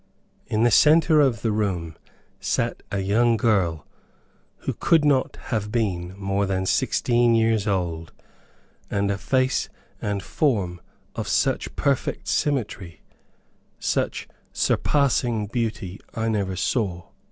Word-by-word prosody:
In 110 +1 +1
the 120 - +4
center 155 +5 +5
of 125 -7 +1
the 115 - +1
room 90 -7 -2 0.4
sat - - -1
a 100 - -1
young 115 +4 +2
girl, 95 -9 +1 0.8
who - - 0
could 160 -3 +3
not 140 -3 +2 0.2
have 105 -2 -1
been 95 -6 -1
more 100 0 -1
than 95 -1 -1
sixteen 120 +4 +2
years 110 -2 +2
old; 85 -5 -2 0.8
and 100 0 0
a 100 - -1
face 130 +5 +1 0.3
and 100 -2 -2
form 100 - 0 0.3
of - - -4
such - - 0
perfect - - -1
symmetry, 105 - -2 0.8
such - - -1 0.2
surpassing 120 -6 +1
beauty, 110 -4 -3 0.2
I 115 0 -1
never 100 -4 -1
saw. 95 -3 -1
105 Hz, 120 wpm, -24 LUFS, 95-120 Hz, 0.8 s, center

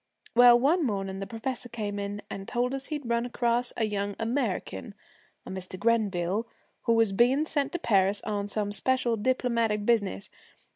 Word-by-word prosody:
Well, 240 0 +8
one 315 +7 +3
morning 195 -5 -2
the 195 - -5
professor 245 +2 -5
came 210 -3 -4
in 200 +1 -4
and 195 0 -7
told 250 +1 0
us 270 0 -4
he'd 295 -5 -4
run 235 0 +1
across 240 0 0
a 230 - +1
young 205 -1 -2
American, 225 - -2 0.5
a - - -7
Mr. 185 0 -5
Grenville, 210 -2 +1 0.4
who 230 - +4
was 225 -3 +3
being 250 +9 +3
sent 285 -3 -1
to - - 0
Paris 200 - +2
on 205 -1 -2
some 205 0 -2
special 240 +3 +1
diplomatic 230 -2 0
business. 205 - 0
225 Hz, 165 wpm, -28 LUFS, 200-245 Hz, 0.5 s, Well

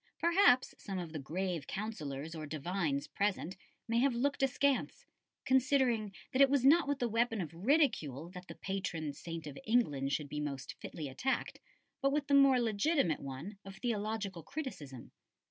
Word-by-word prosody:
Perhaps 340 -7 +4
some 195 -2 -5
of 170 -3 -5
the 155 - -3
grave 170 +3 -3
Councillors 160 -8 -4
or 155 -2 -6
divines 155 -1 -1
present 195 -3 -1 0.3
may 230 0 +2
have 260 -1 +3
looked 275 +4 0
askance, 270 0 +1 0.4
considering 260 -5 +3 0.2
that 260 - +3
it 275 - +8
was 275 -2 +2
not 320 +3 +6
with 285 -1 0
the 245 - 0
weapon 230 0 +1
of 165 -4 -4
ridicule 175 - +1
that 180 0 -10
the - - -8
patron 170 -6 -3
saint 165 +2 -7
of 145 -2 -7
England 145 - +1
should 145 0 -1
be 150 +1 -4
most 140 -3 -4
fitly 155 -3 -6
attacked, 245 - -2 0.4
but 275 - +3
with 290 0 0
the 285 - 0
more 275 -2 +7
legitimate 225 - +1
one 145 +10 -7
of 195 0 -9
theological 210 -4 -2
criticism. 155 - -7
200 Hz, 165 wpm, -34 LUFS, 155-260 Hz, 0.4 s, it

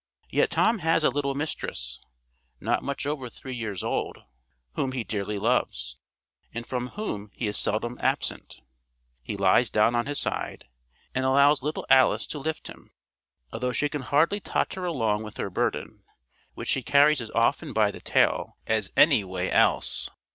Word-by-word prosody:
Yet - - +3
Tom 225 0 +2
has 165 -1 +2
a 150 - +4
little 140 0 -1
mistress, 65 - -4 0.6
not - - 0
much 140 0 -4
over 145 -4 -3
three 130 +3 -8
years 110 -6 -4
old, - - -2 0.5
whom 130 -1 -1
he 125 -3 -2
dearly 105 -1 -3
loves, 65 - 0 0.6
and 115 +1 -5
from 125 0 -3
whom 105 - -4
he 115 - -2
is 105 - -3
seldom 120 +3 -2
absent. - - -2 0.6
He 100 - -4
lies 100 +5 +4
down 105 +2 +3
on 120 +2 0
his 145 0 -2
side, - - -3 0.5
and 130 - 0
allows 140 +2 +5
little 150 +3 -3
Alice 130 -1 +5
to 150 - -4
lift 160 +3 -4
him, - - -11 0.6
although 125 +2 -2
she 145 +3 +1
can 150 -1 -4
hardly 150 +10 +2
totter 190 -2 -2
along 115 -11 0
with 110 -1 -8
her 100 - -3
burden, - - -2 0.5
which - - -6
she 135 - +2
carries 145 +2 +4
as 115 - -6
often 135 +6 +2
by 105 -3 +3
the - - -11
tail - - +1
as 110 -3 0
any 145 -8 +6
way 95 -1 -3
else. - - +2
125 Hz, 170 wpm, -26 LUFS, 105-145 Hz, 0.6 s, any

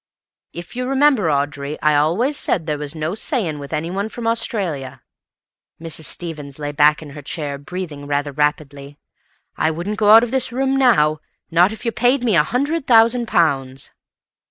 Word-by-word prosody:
"If 170 +6 -9
you 250 0 -3
remember, 270 - +3
Audrey, 145 0 -2
I 150 -1 +2
always 180 - +1
said 175 - -1
there 150 -2 -2
was 150 +1 -5
no 155 +2 -3
saying 205 - -2
with 140 -1 -9
anyone 175 +7 -3
from 235 +1 -7
Australia." 165 - -2 0.8
Mrs. 160 -1 -5
Stevens 150 -5 -4
lay 145 -1 -4
back 150 +1 +3
in 145 - -11
her 145 +1 -9
chair, 145 -1 -5
breathing 150 -2 -7
rather 145 0 -1
rapidly. 145 -1 -2 0.6
"I 155 - +1
wouldn't 175 +7 -4
go 210 -1 +3
out 225 +2 +9
of 240 - -3
this 260 -2 -1
room 265 +2 0
now, 175 - +3 0.3
not 175 +4 +4
if 220 - -9
you 230 - +1
paid 245 +4 +1
me 225 -6 +2
a 160 - +6
hundred 280 - -2
thousand 235 0 +4
pounds." 135 - 0
165 Hz, 175 wpm, -19 LUFS, 145-230 Hz, 0.8 s, out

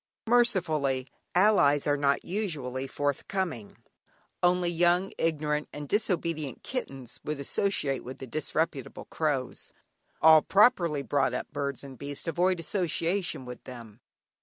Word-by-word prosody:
Mercifully, 160 - +2 0.3
allies 175 -8 +4
are 145 - +3
not 140 -1 +1
usually 145 -10 -3
forthcoming; 145 - -3 0.6
only 180 0 +3
young, 175 +2 +2
ignorant, 150 -2 0
and 145 -1 -7
disobedient 165 - -1
kittens 135 - -5
would 150 -1 -3
associate 140 -3 0
with 130 +1 -8
the 135 - -7
disreputable 155 +1 -3
crows; 145 -5 -2 0.5
all 160 0 +8
properly 175 - +3
brought 140 0 +1
up - - -4
birds 140 -3 -3
and 135 -3 -11
beasts 140 0 -5
avoid 175 +2 +1
association 170 -3 -1
with 125 0 -9
them. 115 -4 -10
150 Hz, 120 wpm, -28 LUFS, 140-180 Hz, 0.6 s, all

